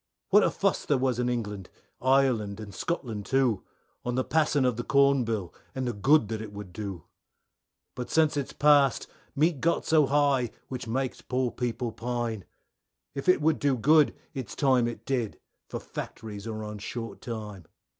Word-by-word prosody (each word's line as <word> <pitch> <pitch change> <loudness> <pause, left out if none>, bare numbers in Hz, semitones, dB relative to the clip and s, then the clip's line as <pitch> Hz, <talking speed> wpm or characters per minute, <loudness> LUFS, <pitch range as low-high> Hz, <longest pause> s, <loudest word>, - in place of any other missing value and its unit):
What - - +7
a - - +3
fuss - - 0
there 145 - +2
was 130 -2 0
in 125 0 +1
England, 105 -6 -3 0.3
Ireland, 125 -6 +2
and 105 -2 -8
Scotland 115 - -3
too, 130 -7 +2 0.4
On 125 0 -2
the 130 - +1
passing 150 -3 +2
of 125 -2 +2
the 120 - -3
Corn 140 -1 +4
Bill 105 -6 -3 0.2
and 130 -1 -2
the 120 - -1
good 130 +4 +4
that 110 -1 -3
it 110 -2 -7
would 100 -3 -9
do, 95 -5 -5 0.9
But 125 - -6
since 155 -2 +3
it's 140 -2 -2
past 145 -3 +4 0.3
Meat 150 0 +2
got 170 0 +1
so 155 -3 +4
high 140 -4 +2 0.2
which 125 -2 -5
makes 130 +3 -2
poor 125 -1 -1
people 120 -1 -2
pine. 120 -4 -3 0.7
If 140 +6 -2
it 180 - +5
would 160 -1 +3
do 140 -3 +2
good 150 +5 +5 0.2
it's 130 -7 -6
time 130 -4 +3
it 120 - -6
did 125 -6 -2 0.3
for - - -4
factories 105 -1 -7
are 110 -1 -4
on 105 -1 -6
short 115 +3 -6
time. 105 - -6
125 Hz, 175 wpm, -28 LUFS, 110-140 Hz, 0.9 s, What